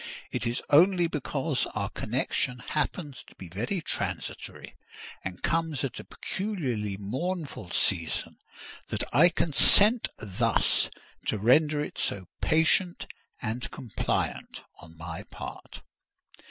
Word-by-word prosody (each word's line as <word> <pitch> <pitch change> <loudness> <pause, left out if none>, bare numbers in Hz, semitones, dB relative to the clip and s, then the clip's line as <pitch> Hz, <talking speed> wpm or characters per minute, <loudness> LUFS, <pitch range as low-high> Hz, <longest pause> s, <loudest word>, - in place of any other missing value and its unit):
It - - -1
is 120 +1 -2
only 175 +4 +6
because 150 -2 -1
our 105 0 -2
connection 125 +2 -1
happens 140 +3 -3
to - - -17
be 90 - -10
very 120 - -2
transitory, - - -4 0.5
and 90 -1 -6
comes 165 -3 0
at 135 - -3
a - - -7
peculiarly 130 - -3
mournful 135 - -4
season, 85 -2 0 0.5
that - - -1
I 170 +5 +7
consent 200 - +6
thus 100 -3 +2 0.4
to - - +1
render 145 +8 +4
it - - -7
so 95 -2 -1 0.2
patient 165 +3 +3 0.4
and 115 +3 -3
compliant 120 -5 -3 0.2
on 80 -1 -14
my 80 0 -6
part." - - -9
135 Hz, 115 wpm, -28 LUFS, 105-165 Hz, 0.5 s, I